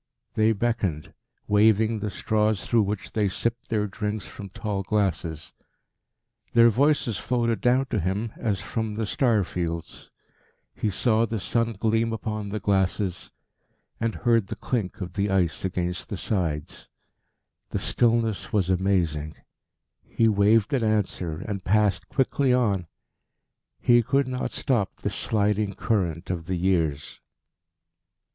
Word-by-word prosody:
They 110 +1 +3
beckoned, 100 - -2 0.3
waving 110 +1 +3
the 105 0 -2
straws 105 0 0
through 115 -2 +3
which 105 -1 -3
they 105 -2 +1
sipped 115 +5 -3
their 105 -2 +1
drinks 105 +1 -4
from 100 -2 -9
tall 100 +1 -3
glasses. 90 -6 -2 1.0
Their 115 0 +7
voices 135 -3 +2
floated 120 -2 0
down 125 +2 +3
to 110 - +1
him 100 +5 -2
as 105 -5 -2
from 110 -2 -3
the 110 0 -1
star 110 -1 +2
fields. 85 -2 -5 0.6
He 110 - -1
saw 115 +3 +2
the 110 -1 -3
sun 115 +3 0
gleam 115 +2 0
upon 110 -2 -4
the 105 +2 -3
glasses, 95 -2 0 0.7
and 115 -1 -1
heard 115 -4 +2
the - - -5
clink 115 -6 -3
of 90 - -5
the 100 0 0
ice 90 -4 +1
against 90 -1 -3
the 100 - -4
sides. 85 -8 -3 0.8
The - - -2
stillness 115 -3 +1
was 95 -3 +1
amazing. 85 -5 0 0.7
He 115 - +1
waved 105 +4 +3
an 130 -4 +1
answer, 95 -7 -1
and 100 -3 -4
passed 105 0 +2
quickly 135 0 +1
on. 105 -8 +1 0.9
He 120 -1 +5
could 135 +4 +1
not 125 0 -2
stop 115 -8 -1
this - - -4
sliding 105 -1 0
current 90 -6 -1
of 85 -2 -4
the 95 - -1
years. 85 -5 0
105 Hz, 140 wpm, -25 LUFS, 95-115 Hz, 1.0 s, Their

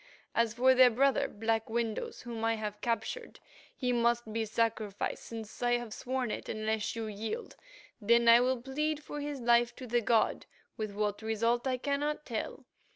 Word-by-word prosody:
As 230 -1 +1
for 260 +2 +5
their 255 -1 +7
brother, 270 +3 +2
Black 225 +1 -1
Windows, 225 -1 -2
whom 235 -2 -5
I 225 0 +2
have 210 -1 -5
captured, 245 - -3 0.4
he 250 -2 0
must 235 -2 +1
be 225 0 0
sacrificed, 220 -2 -1
since 225 -2 -8
I 240 0 +2
have 240 -3 -2
sworn 255 -2 -2
it, - - -5
unless 215 0 -1
you 225 -1 -3
yield, 220 - -5 0.4
when 235 +2 +4
I 230 +1 +9
will 255 0 +1
plead 300 +3 -2
for 295 - -6
his 285 -2 -4
life 235 0 +3
to 260 - -8
the 240 0 +1
god, 225 0 +2 0.3
with 215 -2 -4
what 210 0 -1
result 230 +3 0
I 255 -1 +1
cannot 290 +3 -1
tell. 225 -3 -4
235 Hz, 175 wpm, -31 LUFS, 220-255 Hz, 0.4 s, I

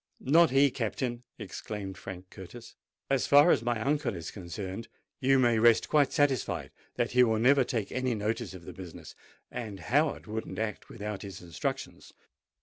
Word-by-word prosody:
"Not 165 +5 +5
he, 135 +1 +4
Captain!" 120 +1 -2 0.2
exclaimed 100 -3 -6
Frank 90 0 -9
Curtis. 110 +6 -11 0.3
"As 135 -1 +1
far 145 +4 +7
as - - +3
my 120 -1 -1
uncle 140 -2 0
is 85 -2 -6
concerned, 95 +2 -6 0.3
you 135 +1 +4
may 120 -3 +3
rest 115 0 +5
quite 145 -3 +4
satisfied 145 -6 0 0.2
that 120 - 0
he 125 0 +6
will 110 -2 +2
never 130 +4 +5
take 115 -4 -3
any 130 -2 0
notice 110 0 -2
of 85 -2 -11
the - - -8
business: 90 -3 -10 0.4
and 105 -5 -6
Howard 145 - +1
wouldn't 110 +1 -5
act 110 -1 -4
without 105 -2 -5
his 100 -3 -8
instructions." 85 -1 -5
115 Hz, 165 wpm, -29 LUFS, 100-130 Hz, 0.4 s, far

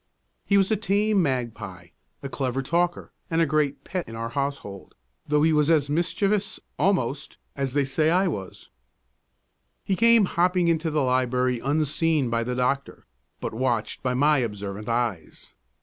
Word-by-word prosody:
He 200 - +4
was 195 +1 +2
a - - +4
tame 205 0 +1
magpie, 125 -7 -3 0.3
a - - -3
clever 135 -1 -2
talker, 175 +4 -1 0.2
and 165 - 0
a 165 - +4
great 150 -2 0
pet 185 -2 -4
in 115 - -8
our 115 0 -4
household, 135 -7 -5 0.3
though 150 0 +2
he 160 0 +4
was 150 0 +3
as 145 -3 +2
mischievous, 195 +5 0 0.2
almost, 150 -8 0 0.2
as 135 -2 -2
they 145 -1 +2
said 155 +4 +1
I 185 +3 +3
was. 100 - -6 1.1
He 195 - 0
came 230 +1 +5
hopping 180 0 +1
into 165 0 +1
the 150 -2 0
library, 125 -1 +1
unseen 150 0 +1
by 115 0 +1
the 125 +1 -3
doctor, 130 +2 -2 0.3
but - - -4
watched 120 -2 -1
by 125 -1 -1
my 145 +2 +3
observant 105 -2 -4
eyes. 115 -8 -3
145 Hz, 160 wpm, -25 LUFS, 125-170 Hz, 1.1 s, came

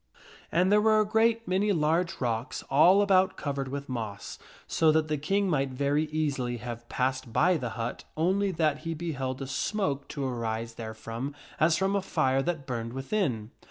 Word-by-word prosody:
And 180 +3 +3
there 210 0 +5
were 215 0 +4
a 215 - +3
great 225 +2 +2
many 195 +3 +2
large 165 0 +1
rocks 120 0 -2
all 180 +8 +6
about 190 -1 +3
covered 140 -2 -3
with 140 +1 -5
moss, 110 -5 -5 0.3
so 160 -1 +3
that 155 0 +1
the 155 - 0
King 195 +7 +1
might 140 -6 +1
very 140 +4 0
easily 145 -6 -1
have 120 0 -7
passed 130 -2 -1
by 165 +10 +3
the 125 -7 -2
hut 115 +1 -4
only 190 +5 +2
that 155 -4 +1
he 165 -1 -4
beheld 135 -5 -3
a - - -4
smoke 145 0 -1
to 140 -2 -4
arise 115 -2 -3
therefrom 115 +4 -6 0.2
as 160 +1 +4
from 190 +2 +1
a 200 - +1
fire 135 -8 +1
that 160 -2 -2
burned 115 -3 -4
within. 135 - -2
145 Hz, 180 wpm, -28 LUFS, 125-180 Hz, 0.3 s, all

